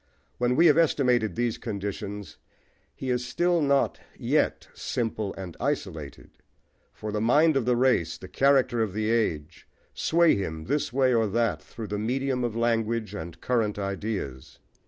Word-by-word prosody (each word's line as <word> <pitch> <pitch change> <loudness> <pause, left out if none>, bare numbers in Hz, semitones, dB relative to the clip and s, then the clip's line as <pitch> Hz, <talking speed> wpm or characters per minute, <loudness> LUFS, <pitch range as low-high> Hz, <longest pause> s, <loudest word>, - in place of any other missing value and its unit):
When 125 +1 +2
we 165 - +5
have 155 -1 +6
estimated 125 -8 +2
these 120 -1 -1
conditions 100 - -5 0.6
he 130 - -3
is 125 0 0
still 175 +7 +1
not 140 -1 +2 0.2
yet - - 0
simple 110 -4 -2
and 95 -3 -7
isolated; 85 - -4 0.6
for 105 - -6
the 105 0 -1
mind 150 +7 +4
of 135 -4 +1
the 125 0 +3
race, 125 -9 +2
the - - -10
character 135 -4 +3
of 105 -4 -1
the 110 +1 0
age, 85 -9 -1 0.3
sway 170 0 +3
him 80 -5 -4
this 145 - -1
way 130 0 +3
or 115 -2 +3
that 115 +2 0
through 115 - -8
the 105 0 -3
medium 125 +3 -1
of 120 -2 -2
language 115 -1 0
and 80 0 -7
current 115 -5 0
ideas. 100 - -4
115 Hz, 155 wpm, -27 LUFS, 100-130 Hz, 0.6 s, have